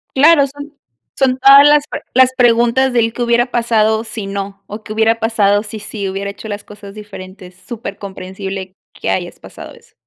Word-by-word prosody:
Claro, 285 0 +5
son 285 +2 -11 0.5
son 260 -1 +2
todas 275 +2 +8
las 295 0 +4
pre - - -5
las 260 0 +5
preguntas 240 +2 +3
del 230 -1 +2
¿Qué 245 - -7
hubiera 240 +1 +2
pasado 220 -1 +1
si 215 -2 -6
no, 195 0 -6
o 210 +2 -8
qué 215 - -8
hubiera 225 +1 +2
pasado 205 -3 +2
si 215 0 -8
sí 210 -1 -6
hubiera 195 +1 -4
hecho 205 +2 -9
las 205 -1 -6
cosas 205 -1 -12
diferentes? 185 -3 -11
Supercomprensible 195 -3 -7 0.2
que - - -5
hayas - - -3
pasado - - -11
eso. - - -21
220 Hz, 180 wpm, -16 LUFS, 200-245 Hz, 0.5 s, todas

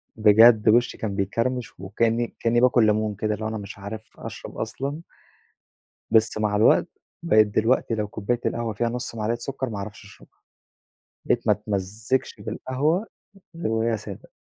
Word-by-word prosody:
بجد 110 +1 +6
وشّي 120 +2 +3
كان 105 -3 -3
بيكرمش، 115 +4 -2
وكأني 115 +5 -1
كأني 120 0 +2
باكل 125 -2 +5
ليمون 110 0 +1
كده 105 +1 -1
اللي 110 +1 -5
هو - - -1
أنا 110 - -4
مش 100 -1 -8
عارف 110 +2 -8
أشرب - - -9
أصلًا. 135 +7 -4 1.1
بس 110 -1 +3
مع 105 -1 0
الوقت، 105 - +4 0.4
بقيت 110 -10 +5
دلوقتي 115 +3 +1
لو 105 -1 -2
كوباية 110 +3 -2
القهوة 115 -1 -1
فيها 115 +3 -1
نص 120 0 -5
معلقة 115 +1 -1
سكر 130 0 -4
ما 105 - -5
اعرفش 105 +2 -7
أشربها، 100 - -18 0.9
بقيت - - 0
ما - - +6
اتمزجش 105 +6 -2
بالقهوة 155 - -1 0.5
غير 165 - -2
وهي 115 0 +1
سادة. - - -10
110 Hz, 160 wpm, -24 LUFS, 105-120 Hz, 1.1 s, بجد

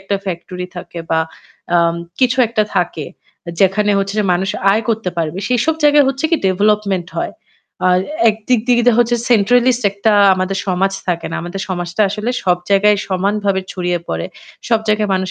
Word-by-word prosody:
একটা 195 +1 -2
ফ্যাক্টরি 180 0 -5
থাকে 175 0 -8
বা 160 - +2 0.6
আম 170 -1 +3 0.3
কিছু 255 0 +2
একটা 220 -1 0
থাকে 170 -4 -1 0.5
যেখানে 205 +2 +3
হচ্ছে 195 0 -2
যে 210 - +2
মানুষ 190 +3 0 0.2
আয় 220 +3 +1
করতে 225 -4 0
পারবে। 165 +1 -2
সেসব 250 +6 +1
জায়গায় 295 -1 +5
হচ্ছে 270 +3 -3
কি 330 - +4
ডেভেলপমেন্ট 200 -1 +1
হয়। - - -2 0.6
আর 180 0 +4 0.3
এক 215 - +2
দিক 250 -3 +3
দিক 240 -1 +4
দিয়ে 240 -2 +5
হচ্ছে 240 0 +3
সেন্ট্রালিস্ট 245 +3 +3
একটা 200 +2 +1 0.2
আমাদের 185 +1 -2
সমাজ 190 +1 +1 0.2
থাকে 170 -1 -1
না। - - -3
আমাদের 175 +3 -6
সমাজটা 175 +2 -2
আসলে 210 +4 -2
সব 180 -1 +2
জায়গায় 205 +1 +4
সমানভাবে 195 +1 0
ছড়িয়ে 180 -1 -1
পড়ে। - - -3 0.4
সব 225 -2 +2
জায়গায় 215 -1 +1
মানুষ 185 -1 -2
200 Hz, 175 wpm, -17 LUFS, 180-225 Hz, 0.6 s, জায়গায়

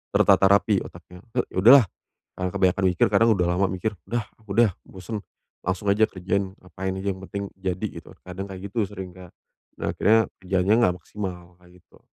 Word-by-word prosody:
tertata 95 - +5
rapi 100 0 +3
otaknya, 90 +1 -12 0.2
"Eee, - - +2
ya - - -7
udahlah," 120 +3 +8 0.5
karena 90 0 -2
kebanyakan 95 +1 +1
mikir, 90 - +2
karena 115 - +3
udah 90 -4 +2
lama 90 +2 +1
mikir, 100 +3 -3
"Udah 120 -2 -2 0.3
udah 115 +1 +4
bosen, 100 +3 -7 0.4
langsung 95 +2 -2
aja 100 +2 +3
kerja, 95 +1 -3
ngapain 95 0 -6
aja, 100 - -5
yang 95 - -13
penting 100 +1 -5
jadi," 95 +2 -3 0.2
gitu, - - -16 0.2
kadang, 95 +2 -6
kayak 95 +1 -7
gitu, 105 +2 -1
sering 95 -2 -7
Kak. 90 -2 -13 0.5
Nah, - - -2
akhirnya 110 +2 +4 0.2
kerjaannya 95 +3 +2
nggak 90 -3 +3
maksimal, 90 -3 -7
kayak 90 +1 -19
gitu. - - -25
95 Hz, 180 wpm, -24 LUFS, 90-100 Hz, 0.5 s, udahlah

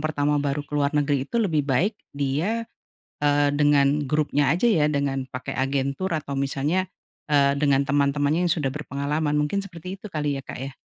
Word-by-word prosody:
pertama 150 -1 0
baru 145 0 -2
keluar 145 0 0
negeri 140 -2 +1
itu - - -3
lebih 165 -10 +1
baik 175 - +2 0.2
dia, 160 +12 -1 0.6
eee, 145 0 +3
dengan 145 0 +3
grupnya 145 -2 +1
aja, 185 +8 0
ya? 155 -8 +3
Dengan 140 -2 -1
pakai 130 0 -5
agen 135 +1 0
tur 190 +1 -2
atau 145 -3 -3
misalnya, 140 +7 0 0.4
eee, 140 -1 +4
dengan 140 -1 +2
teman-temannya 145 +4 +1
yang - - +4
sudah 145 -5 -1
berpengalaman, 150 +1 -2
mungkin 150 +7 0
seperti 185 0 -8
itu 210 - -8
kali 150 -3 -1
ya - - -5
Kak, - - -7
ya? 135 0 -6
145 Hz, 175 wpm, -24 LUFS, 140-155 Hz, 0.6 s, eee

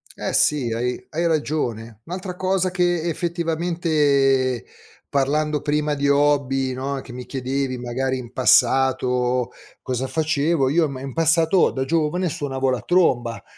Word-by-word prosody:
Eh - - -4
sì, 135 -6 +2
hai 125 +2 -2
hai 165 +2 -2
ragione. 120 -9 -2
Un'altra 180 +1 -6
cosa 185 0 0
che 175 -2 +1
effettivamente, 160 -7 +1 0.5
parlando 150 +2 0
prima 150 0 0
di 140 0 -1
hobby, 140 -2 +2
no, 135 +1 -4
che 130 - -12
mi 125 0 -8
chiedevi 130 -1 -3
magari 130 +2 -2
in 120 -2 -9
passato 125 -1 +2 0.3
cosa 130 0 -3
facevo, 150 -1 +1
io 160 +3 +3
im 140 -3 -5
in 135 0 -7
passato, 165 +2 +3
da 130 - -2
giovane 165 +4 0
suonavo 135 -2 -2
la 125 -3 -1
tromba. 125 -10 +1
140 Hz, 135 wpm, -22 LUFS, 130-160 Hz, 0.5 s, io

